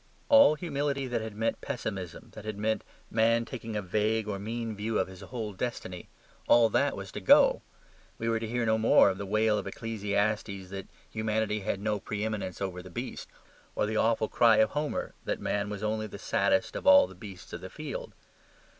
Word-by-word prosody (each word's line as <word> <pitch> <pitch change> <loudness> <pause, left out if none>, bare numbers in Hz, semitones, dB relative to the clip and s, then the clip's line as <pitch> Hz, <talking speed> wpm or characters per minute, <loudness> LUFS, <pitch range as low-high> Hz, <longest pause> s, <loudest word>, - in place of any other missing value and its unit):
All 280 - +7
humility 145 -4 -2
that 120 -3 -2
had 110 -1 -6
meant 115 +2 -1
pessimism, 100 - -5
that 110 - -9
had 110 -1 -5
meant 110 +1 0 0.3
man 115 +1 +3
taking 115 -1 -6
a 105 - -1
vague 105 +3 0
or 100 -2 -3
mean 115 +2 -4
view 110 +2 -2
of 95 - +1
his 95 -1 -12
whole 110 -4 -5
destiny 95 -4 -5 0.4
all 115 -1 +6
that - - +1
was - - -7
to - - -6
go. - - +6 0.6
We 115 - -3
were 115 -1 +1
to 115 - -4
hear 120 +1 -1
no 110 0 +2
more 105 -3 +6
the 100 +1 -6
wail 110 +1 +2
of - - -6
Ecclesiastes 105 -3 -2
that 95 -1 -6 0.2
humanity 110 -1 -1
had 100 -1 -2
no 105 0 0
pre 105 +2 -4
eminence 105 -5 -3
over 90 -2 -3
the 90 - -11
brute, 85 - -6 0.5
or - - +1
the 110 +1 -1
awful 110 -1 +2
cry 115 -1 +5
of 110 - +4
Homer 150 0 -2
that - - -2
man 105 0 -1
was 105 0 -5
only 110 0 -1
the - - -9
saddest 115 -1 +1
of - - -4
all 285 0 +9
the - - -11
beasts 100 -5 -11
of - - -5
the - - -7
field. - - -7
110 Hz, 200 wpm, -29 LUFS, 100-115 Hz, 0.6 s, all